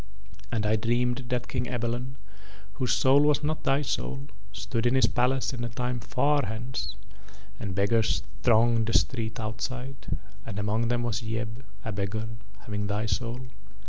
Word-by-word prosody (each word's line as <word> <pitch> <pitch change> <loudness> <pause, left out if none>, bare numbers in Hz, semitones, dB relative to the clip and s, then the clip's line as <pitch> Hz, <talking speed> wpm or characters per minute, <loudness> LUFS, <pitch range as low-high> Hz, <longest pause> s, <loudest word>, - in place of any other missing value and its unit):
And 110 -3 0
I 110 +1 +3
dreamed 120 +3 +1
that 125 -1 0
King 125 - -1
Ebalon, 120 +2 -2 0.6
whose 125 +2 0
soul 135 +3 +6
was 150 0 +4
not 155 +1 -1
thy 135 +2 +3
soul, 65 - -2 0.2
stood 100 +4 -1
in 125 - +3
his 130 - +6
palace 130 +2 +2
in 120 -1 -3
a 120 - -2
time 125 +1 -2
far 140 +2 +2
hence, 110 -1 -3 0.6
and 100 -4 -3
beggars 110 +3 +2 0.2
thronged 115 -1 +4
the 115 - 0
street 115 -3 +1
outside, 120 +5 -4 0.3
and 105 -2 -6
among 105 +3 +1
them 120 0 +1
was 120 -1 -1
Yeb, 110 +1 -3 0.2
a 110 - -2
beggar, 105 +2 -2 0.3
having 105 -1 -3
thy 105 +2 0
soul. 120 +3 -2
115 Hz, 160 wpm, -28 LUFS, 110-125 Hz, 0.6 s, soul